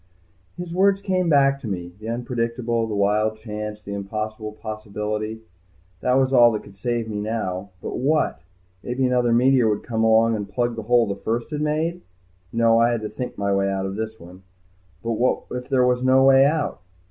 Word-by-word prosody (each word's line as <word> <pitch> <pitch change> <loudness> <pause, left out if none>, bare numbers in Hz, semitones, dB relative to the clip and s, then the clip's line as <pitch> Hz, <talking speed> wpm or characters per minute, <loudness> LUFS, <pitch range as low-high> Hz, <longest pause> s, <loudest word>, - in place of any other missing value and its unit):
His 175 -1 -6
words 195 +2 +3
came 185 -3 0
back 140 -2 +4
to 130 - -7
me. 90 -3 -5
The 110 +1 -6
unpredictable, 115 -1 -2
the 105 - -3
wild 105 +2 +1
chance, 105 -1 -6
the 100 -1 -8
impossible 110 +2 -4
possibility. 110 0 -5 0.6
That 125 +5 +1
was 135 0 +2
all 120 -2 +7
that 105 - -3
could 100 - -15
save 120 0 -1
me 105 -2 -4
now. 100 -3 -3
But - - -4
what? 150 +4 +1 0.4
Maybe 125 +2 -1
another 125 -1 +2
meteor 125 0 +4
would 105 -1 -1
come 115 -2 -1
along 115 0 +4
and 105 -2 -5
plug 120 +1 -1
the 115 - -4
hole 120 -1 +5
the 100 -2 -3
first 115 +7 -3
one 150 - -3
had - - -1
made. 160 +4 -1 0.5
No. 115 0 +3
I 115 +1 +4
had 120 -2 -1
to 105 - -4
think 125 - -6
my 100 0 0
way 100 0 +1
out 95 0 -2
of 95 0 -4
this 110 +1 -5
one. 90 +2 -13 0.6
But 115 - -2
what 125 - +1
if 125 +1 -5
there 130 -2 +3
was 125 0 +2
no 130 +1 +4
way 135 0 +6
out? 145 - -1
115 Hz, 205 wpm, -23 LUFS, 105-130 Hz, 0.6 s, all